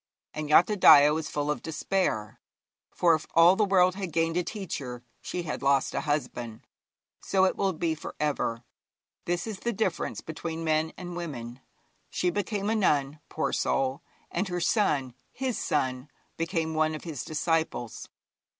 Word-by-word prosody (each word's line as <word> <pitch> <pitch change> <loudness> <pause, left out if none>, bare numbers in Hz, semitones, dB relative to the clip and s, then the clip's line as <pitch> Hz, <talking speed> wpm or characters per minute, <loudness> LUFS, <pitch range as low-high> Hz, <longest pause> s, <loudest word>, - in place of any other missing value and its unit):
And 155 -1 -4
Yathodaya 155 -4 +7
was 160 0 -3
full 145 0 -1
of 150 - -3
despair, 155 - -2 0.5
for 170 -2 +3
if 155 -1 -1
all 170 +3 +7
the 215 - +2
world 185 -2 +4
had 190 -2 -5
gained 165 +1 0
a 180 - +2
teacher, 145 - -5 0.2
she 180 - -4
had 150 - -4
lost 140 -1 +2
a - - -1
husband. 125 -7 -3 0.6
So 190 -1 +2
it 185 - +1
will 195 -1 +1
be 165 0 -1
for 155 - -8
ever. 135 -6 -1 0.6
This 175 0 -1
is 215 -4 -5
the 235 - -1
difference 200 -5 -2
between 160 +1 -5
men 155 0 +1
and 175 -1 -7
women. 130 -8 -6 0.5
She 180 - 0
became 205 +2 -2
a 220 - +1
nun, 150 -8 +1
poor - - -2
soul! 135 +2 0 0.3
and 200 - -1
her 175 -1 -2
son 150 - +1 0.2
his 260 -2 -3
son 130 -1 -1 0.3
became 165 -1 -2
one 155 0 +1
of 155 - -8
his 160 -6 -5
disciples. 160 -6 -2
160 Hz, 160 wpm, -28 LUFS, 145-180 Hz, 0.6 s, Yathodaya